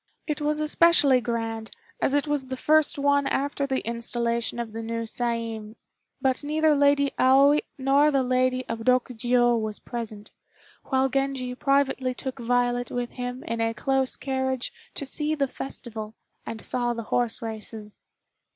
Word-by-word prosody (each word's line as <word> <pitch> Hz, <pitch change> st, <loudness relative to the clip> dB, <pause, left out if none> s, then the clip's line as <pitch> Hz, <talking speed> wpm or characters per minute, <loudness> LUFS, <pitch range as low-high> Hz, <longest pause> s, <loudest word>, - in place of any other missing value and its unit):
It 300 Hz, -1 st, -3 dB
was 300 Hz, +1 st, +1 dB
especially 305 Hz, -4 st, +4 dB
grand, 225 Hz, -2 st, -3 dB, 0.3 s
as 275 Hz, -, +2 dB
it 290 Hz, -, +2 dB
was 290 Hz, -3 st, -1 dB
the 260 Hz, 0 st, -4 dB
first 310 Hz, +2 st, +3 dB
one 285 Hz, 0 st, +2 dB
after 280 Hz, 0 st, -1 dB
the 265 Hz, -1 st, -1 dB
installation 235 Hz, 0 st, -1 dB
of 235 Hz, -2 st, -4 dB
the 225 Hz, -, -4 dB
new 230 Hz, 0 st, -3 dB
Saiin, 230 Hz, -2 st, -3 dB, 0.4 s
but 265 Hz, 0 st, 0 dB
neither 310 Hz, +1 st, +2 dB
Lady 285 Hz, -1 st, +3 dB
Aoi 275 Hz, +3 st, +6 dB, 0.3 s
or 285 Hz, +2 st, +5 dB
the 275 Hz, -3 st, +2 dB
Lady 255 Hz, 0 st, +1 dB
of 230 Hz, -, -3 dB
Rokjiô 240 Hz, -1 st, +2 dB
was 215 Hz, -1 st, -3 dB
present, 220 Hz, -3 st, -6 dB, 0.5 s
while 265 Hz, -1 st, +2 dB
Genji 270 Hz, -1 st, -1 dB
privately 270 Hz, -1 st, +1 dB
took 265 Hz, +1 st, -5 dB
Violet 245 Hz, +1 st, +1 dB
with 245 Hz, -1 st, -3 dB
him 250 Hz, 0 st, -5 dB
in 230 Hz, 0 st, -3 dB
a 225 Hz, 0 st, 0 dB
close 270 Hz, 0 st, 0 dB
carriage 265 Hz, -1 st, -2 dB, 0.2 s
to 280 Hz, -, -1 dB
see 300 Hz, +3 st, 0 dB
the 280 Hz, -2 st, +1 dB
festival, 225 Hz, -5 st, -7 dB, 0.3 s
and 225 Hz, -1 st, -5 dB
saw 240 Hz, -1 st, 0 dB
the 230 Hz, -, -4 dB
horse 240 Hz, -2 st, +1 dB
races. 220 Hz, -1 st, -7 dB
255 Hz, 155 wpm, -26 LUFS, 230-275 Hz, 0.5 s, Aoi